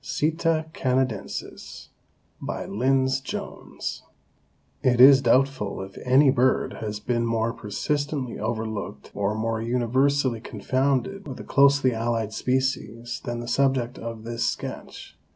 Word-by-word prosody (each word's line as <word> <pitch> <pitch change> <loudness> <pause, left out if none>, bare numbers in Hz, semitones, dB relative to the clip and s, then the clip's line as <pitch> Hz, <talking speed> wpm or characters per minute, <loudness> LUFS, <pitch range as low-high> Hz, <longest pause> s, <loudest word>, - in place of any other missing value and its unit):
(Sitta 160 0 0
canadensis.) 130 -6 -3 0.5
BY - - -4
LYNDS 130 +4 +1
JONES. - - -6 0.8
It 125 -2 +2
is 135 +1 +9
doubtful 130 -4 +1
if 95 0 -11
any 130 +2 +5
bird 130 0 +1
has 105 -1 -4
been 120 +2 -1
more 115 0 0
persistently 145 +4 -3
overlooked 110 -1 -4
or 100 +1 -1
more 110 0 -1
universally 125 +1 +1
confounded 135 - -1
with 130 - -7
a - - -7
closely 140 -2 +4
allied 115 -1 -1
species 120 -2 -2
than 120 -1 -3
the 120 - -7
subject 130 -1 +1
of 115 -1 -6
this 115 +1 -3
sketch. - - -5
125 Hz, 120 wpm, -25 LUFS, 115-135 Hz, 0.8 s, is